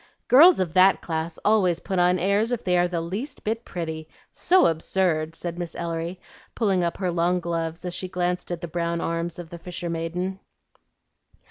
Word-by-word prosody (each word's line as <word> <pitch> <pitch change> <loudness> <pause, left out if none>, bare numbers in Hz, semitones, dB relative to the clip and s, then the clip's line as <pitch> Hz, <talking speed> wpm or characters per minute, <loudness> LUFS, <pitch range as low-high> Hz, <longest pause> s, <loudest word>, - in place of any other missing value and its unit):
"Girls 325 +8 +8
of 175 -4 -1
that 185 +1 +5
class 160 0 -3
always 190 -5 +3
put 190 0 -2
on 180 +1 +4
airs 200 +6 +1
if 245 - -2
they 180 -1 +1
are 175 0 +3
the 175 -2 -2
least 195 - -5
bit 225 +2 -2
pretty, 160 -3 -5 0.2
so 370 +1 +3
absurd!" 165 -1 0
said 175 +1 -5
Miss 175 -2 -5
Ellery, 170 +1 -4 0.4
pulling 195 -6 +1
up 170 0 -1
her 185 -2 -1
long 175 +1 +1
gloves 165 0 -3
as 180 - -3
she 185 - -3
glanced 180 0 -2
at 175 -2 -4
the 170 - -4
brown 170 0 -2
arms 170 +1 -2
of 175 -2 -9
the 170 - -8
fisher 175 0 -5
maiden. 175 +3 -3
175 Hz, 190 wpm, -24 LUFS, 165-185 Hz, 0.4 s, Girls